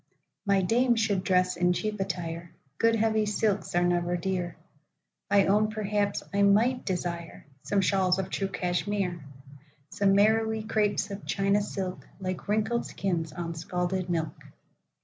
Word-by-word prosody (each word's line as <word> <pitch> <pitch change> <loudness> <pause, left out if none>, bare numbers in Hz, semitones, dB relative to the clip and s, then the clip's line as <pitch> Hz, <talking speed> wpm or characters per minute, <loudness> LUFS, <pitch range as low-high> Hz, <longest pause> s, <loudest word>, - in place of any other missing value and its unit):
My 195 -1 +3
dame 240 +5 +3
should 210 -4 +1
dress 185 -1 +2
in 180 0 +2
cheap 215 +3 -3
attire(Good, 170 - -2
heavy 220 -1 +2
silks 205 -2 0
are 175 - +3
never 175 0 +1
dear);—I 180 +2 -3
own 210 +2 +3
perhaps 205 -1 -1
I 200 - +2
might 225 +6 +4
desireSome 170 -1 -3
shawls 190 -1 +2
of 190 - -3
true 195 - -1
Cashmere,—Some 170 -3 -3
marrowy 220 +1 +3
crapes 210 -1 0
of 200 +1 -7
China 200 +1 +2
silk, 190 -2 -5
Like 185 -2 -4
wrinkled 220 +3 0
skins 170 -5 -2
on 170 +1 -4
scalded 180 +1 -2
milk. 165 -2 -1
190 Hz, 130 wpm, -28 LUFS, 175-210 Hz, -, might